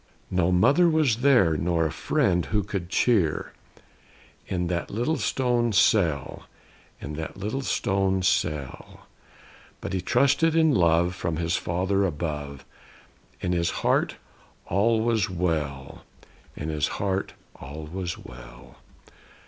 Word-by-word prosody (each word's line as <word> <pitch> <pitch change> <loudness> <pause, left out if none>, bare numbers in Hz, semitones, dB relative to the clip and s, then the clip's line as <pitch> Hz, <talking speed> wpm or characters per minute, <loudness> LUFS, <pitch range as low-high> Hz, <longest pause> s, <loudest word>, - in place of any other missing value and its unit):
No 90 -1 +2
mother 140 - +4
was 155 -8 +2
there, 120 - +4
nor 85 +1 0
a 80 - -1
friend 90 +2 0
who 105 0 0
could 95 -3 -5
cheer, 95 -8 +1 0.9
In 90 -2 -1
that 85 0 -2
little 120 +10 -1
stone 120 -3 0
cell; 95 - +1 0.5
in 75 - -7
that 80 +3 -6
little 105 +8 -3
stone 95 -6 0
cell. 75 -7 -2 0.7
But - - -6
he 95 - -1
trusted 160 - +2
in 160 -2 +4
love, 85 -1 +3
from 85 -3 -3
his 85 +1 0
Father 95 +3 0
above. 75 -5 -4 0.8
In 90 - -1
his 85 -1 +1 0.2
heart, - - +2 0.5
all 110 +4 +2
was 110 -3 +1
well; 75 -7 -3 0.5
in 75 - -5
his 75 -2 0
heart, 95 -1 -2 0.3
all 75 +4 -8
was 90 +2 -5
well. - - -13
90 Hz, 125 wpm, -25 LUFS, 80-105 Hz, 0.9 s, mother